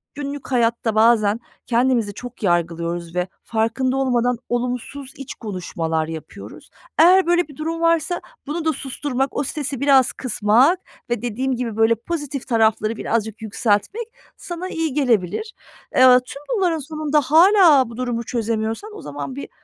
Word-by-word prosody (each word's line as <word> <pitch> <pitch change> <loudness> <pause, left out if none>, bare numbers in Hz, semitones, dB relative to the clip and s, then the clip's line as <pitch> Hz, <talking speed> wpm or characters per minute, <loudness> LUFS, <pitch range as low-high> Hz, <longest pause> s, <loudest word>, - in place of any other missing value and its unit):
günlük 285 -1 -6
hayatta 230 -2 +1
bazen 220 -1 +4 0.3
kendimizi 235 -3 +1
çok 245 +1 -10
yargılıyoruz 170 -1 -1
ve 180 0 0 0.2
farkında 230 +4 0
olmadan 245 -2 +1
olumsuz 250 +3 -3
iç 275 - -8
konuşmalar 165 -6 -3
yapıyoruz. 160 -1 -9 0.3
Eğer 365 +3 +7
böyle 350 -2 +2
bir 290 - -14
durum 330 +2 -3
varsa 335 +1 +1 0.3
bunu 320 +2 -3
da 315 - +2
susturmak, 270 0 -3
o - - +1
stresi 275 -2 -4
biraz 275 -2 +4
kısmak 255 - +2 0.3
ve 240 -3 -1
dediğim 250 +3 -2
gibi 235 -3 -4
böyle 225 +1 +4
pozitif 290 +1 -5
tarafları 220 -1 +2
birazcık 220 -1 -2
yükseltmek 220 - -1 0.3
sana 365 0 -6
iyi 325 -4 -2
gelebilir. 260 - 0 0.4
Eee, - - +4 0.2
tüm 275 +3 -9
bunların 350 -5 +1
sonunda 305 0 0
hâlâ 320 - +6
bu 235 - -10
durumu 240 -2 -2
çözemiyorsan 225 - -3
o - - -9
zaman 140 -2 -6
bir 140 - -7
250 Hz, 145 wpm, -21 LUFS, 220-295 Hz, 0.4 s, Eğer